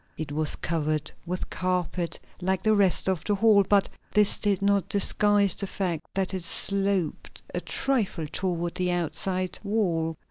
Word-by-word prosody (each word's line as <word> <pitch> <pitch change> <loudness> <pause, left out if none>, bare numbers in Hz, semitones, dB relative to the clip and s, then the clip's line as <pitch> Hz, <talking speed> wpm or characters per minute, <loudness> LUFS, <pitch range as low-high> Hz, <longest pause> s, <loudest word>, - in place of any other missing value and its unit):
It 155 -2 -5
was 155 0 0
covered 155 -2 -2 0.2
with 180 +1 -4
carpet, 180 -2 -2 0.2
like 190 +1 0
the 215 -1 +4
rest 195 -4 +2
of 185 -4 0
the 205 - 0
hall, 215 -1 +5
but 200 -1 +4 0.3
this 210 -1 +6
did 200 -2 0
not 200 -1 +2
disguise 205 0 +3
the 200 - -2
fact 180 -5 -2
that 195 -1 -1
it 185 -2 -3
sloped 195 0 0
a - - -2
trifle 220 - -1
toward 175 +1 -2
the 180 -1 -1
outside 180 +2 0
wall. 175 -7 0
185 Hz, 155 wpm, -26 LUFS, 170-200 Hz, 0.3 s, this